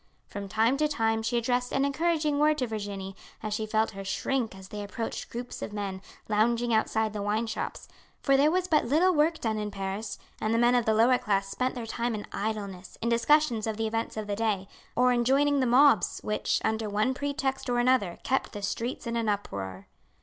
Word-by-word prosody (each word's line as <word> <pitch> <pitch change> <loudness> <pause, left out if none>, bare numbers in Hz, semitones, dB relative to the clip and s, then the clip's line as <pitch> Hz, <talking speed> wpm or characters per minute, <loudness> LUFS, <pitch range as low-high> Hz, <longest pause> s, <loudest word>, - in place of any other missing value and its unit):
From 200 -1 -7
time 225 +6 +2
to 305 +1 +2
time 225 -6 0
she 230 +2 0
addressed 245 +1 0
an 275 0 +2
encouraging 300 0 +1
word 305 0 +4
to 260 - 0
Virginie 200 -4 -5 0.3
as 215 -1 -2
she 215 +1 -2
felt 220 +1 +1
her 195 -1 -7
shrink 230 +2 -1
as 190 0 -12
they 210 - -5
approached 225 +3 -5
groups 245 +1 -6
of 210 - -5
men 195 -2 -4 0.3
lounging 230 +2 +2
outside 220 0 +1
the 210 - -3
wine 210 +3 0
shops, 225 - -5 0.3
for 275 - +3
there 285 +3 +5
was 365 +2 +1
but 310 -4 +3
little 325 +9 +3
work 320 +1 +2
done 220 -2 -1
in 210 0 -2
Paris, 195 +2 -4 0.2
and 220 +1 +1
the - - +3
men 240 +1 +4
of 245 -2 +3
the 220 - +3
lower 245 +3 +5
class 195 -1 0
spent 255 +6 -1
their 240 -2 -4
time 235 +1 -2
in 210 - -5
idleness, 200 -4 -4
in 235 - -1
discussions 235 -1 +3
of 220 -1 -2
the 225 - -1
events 225 0 -2
of 215 - -3
the 205 -1 -2
day, 205 -3 -1 0.3
or 250 0 +4
in 240 -1 +2
joining 280 +3 +3
the 260 - +2
mobs 250 -4 +5
which, 210 - 0
under 220 -1 0
one 215 +5 +1
pretext 275 -1 -2
or 245 - +1
another, 240 -7 +2
kept 265 - 0
the 205 -2 -6
streets 235 +6 -3
in 235 0 -2
an 230 -2 0
uproar. 100 - -4
225 Hz, 215 wpm, -28 LUFS, 210-260 Hz, 0.3 s, there